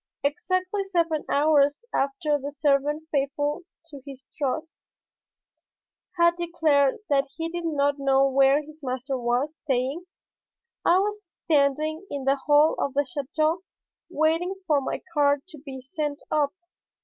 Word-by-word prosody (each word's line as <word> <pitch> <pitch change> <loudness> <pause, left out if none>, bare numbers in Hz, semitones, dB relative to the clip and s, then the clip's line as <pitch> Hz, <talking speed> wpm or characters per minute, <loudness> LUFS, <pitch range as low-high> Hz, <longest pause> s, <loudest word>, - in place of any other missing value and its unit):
Exactly 370 +5 -1
seven 335 -5 0
hours 290 +5 +3
after 290 +2 0
the 285 +1 -5
servant, 290 +2 0
faithful 290 +2 -1 0.2
to 290 -4 -11
his 270 -2 -11
trust, 310 +3 -2 1.4
had 340 0 +4
declared 315 -5 +2
that 275 -2 +2
he 330 0 -2
did 345 0 -5
not 285 -2 +1
know 275 0 +3
where 275 +2 +4
his 310 +1 -15
master 260 0 -3
was 250 +5 -1
staying, 275 +4 -2 0.8
I 350 - +5
was 415 -2 -3
standing 310 +3 +1
in 280 -2 -4
the 270 +1 +3
hall 295 +1 +5
of 275 - -2
the 285 - +3
château 310 +2 -1 0.5
waiting 330 +3 +1
for 295 -5 +2
my - - -4
card 285 -1 +2
to 310 -4 -11
be 265 -2 -9
sent 290 +1 -4
up. 295 -2 +2
290 Hz, 135 wpm, -25 LUFS, 275-325 Hz, 1.4 s, I